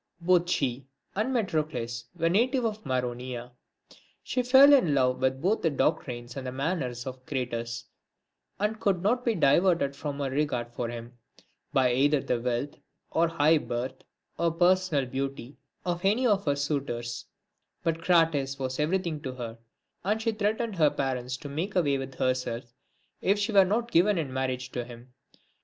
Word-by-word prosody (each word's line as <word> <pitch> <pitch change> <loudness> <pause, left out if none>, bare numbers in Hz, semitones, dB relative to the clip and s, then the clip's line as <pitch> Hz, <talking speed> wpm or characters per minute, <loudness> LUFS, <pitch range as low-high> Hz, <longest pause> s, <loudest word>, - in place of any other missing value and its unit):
II. 170 - -14
Both 175 -1 +4
she 135 -4 -1 0.3
and 215 +6 0
Metrocles 150 - -2
were 165 - +1
natives 240 +8 +2
of 215 -1 -3
Maronea. 125 -2 -3 0.7
She 255 - 0
fell 265 +3 +7
in 175 - +4
love 125 -1 +2
with 130 0 +1
both 205 +5 +2
the 165 - +2
doctrines 120 -4 -1
and 130 -2 -4
manners 135 -6 -2
of 130 -1 -7
Crates, 120 -3 -3 0.7
and 210 +2 -1
could 190 -5 +1
not 245 +5 +2
be 235 -3 +1
diverted 165 -2 +3
from 145 0 -4
her 140 -2 -2
regard 125 -4 -1
for 120 -1 -3
him, 120 +1 -8 0.5
by 130 -2 +3
either 145 +3 +3
the 125 -2 -1
wealth, 125 +4 -2 0.3
or 170 +1 +3
high 160 -1 +3
birth, 125 +1 -4 0.4
or 170 - +3
personal 175 -3 +2
beauty, 135 0 -5 0.3
of 175 0 -2
any 215 +7 +3
of 205 -4 +2
her 140 - +3
suitors, 135 -5 -3 0.6
but 165 0 0
Crates 160 -6 +2
was 130 -1 -3
everything 165 0 0
to 130 -3 -5
her; 115 -2 -7 0.4
and 210 +4 +1
she 225 0 0
threatened 215 0 -1
her 155 -3 +5
parents 130 -2 -2
to 145 - -8
make 160 +8 -3
away 145 -6 +2
with 135 -1 -6
herself, 125 -2 -2 0.5
if 200 +2 +2
she 205 +2 -1
were 195 -2 +6
not 230 +5 -1
given 185 +4 +4
in 145 -6 -2
marriage 130 -1 -2
to 120 - -3
him. 120 +1 -13
140 Hz, 165 wpm, -28 LUFS, 125-185 Hz, 0.7 s, fell